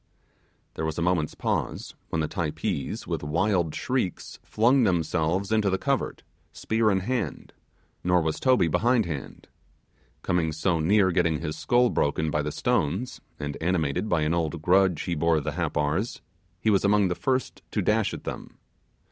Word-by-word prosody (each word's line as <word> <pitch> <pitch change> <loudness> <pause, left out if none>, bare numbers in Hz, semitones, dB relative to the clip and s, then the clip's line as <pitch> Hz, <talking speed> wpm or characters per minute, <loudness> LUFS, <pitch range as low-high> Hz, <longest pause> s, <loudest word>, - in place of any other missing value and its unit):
There - - -5
was 80 -1 -2
a 85 - 0
moment's 85 -4 0
pause, - - -2 0.2
when 80 - -1
the 80 - 0
Typees, 80 -3 -3
with - - -3
wild 85 +2 0
shrieks, 125 -9 -2
flung 125 +5 +3
themselves 85 +1 0
into 110 -2 +2
the 95 - +1
covert, - - -2 0.3
spear 110 0 0
in 95 -2 +1
hand; 120 +2 -3 0.5
nor 90 0 +3
was 80 -2 -1
Toby 130 -9 +3
behindhand. 95 - 0 0.8
Coming 85 -3 0
so 85 +2 0
near 95 +4 +3
getting 85 -3 +1
his 75 -2 -3
skull 120 0 +2
broken 75 +2 0
by 75 - +1
the 75 0 -3
stones, 90 - -1 0.2
and 75 -1 -4
animated 85 +2 0
by 80 - +2
an 75 +2 +1
old 85 -1 -1
grudge 90 -2 +3
he 90 - -2
bore 80 0 +2
the 75 +1 -3
Happars, 80 +5 -1 0.4
he 110 - +2
was 100 - +3
among 100 0 +4
the - - +1
first 130 +6 -2
to - - -1
dash - - +2
at - - -7
them. - - -7
90 Hz, 165 wpm, -26 LUFS, 80-100 Hz, 0.8 s, among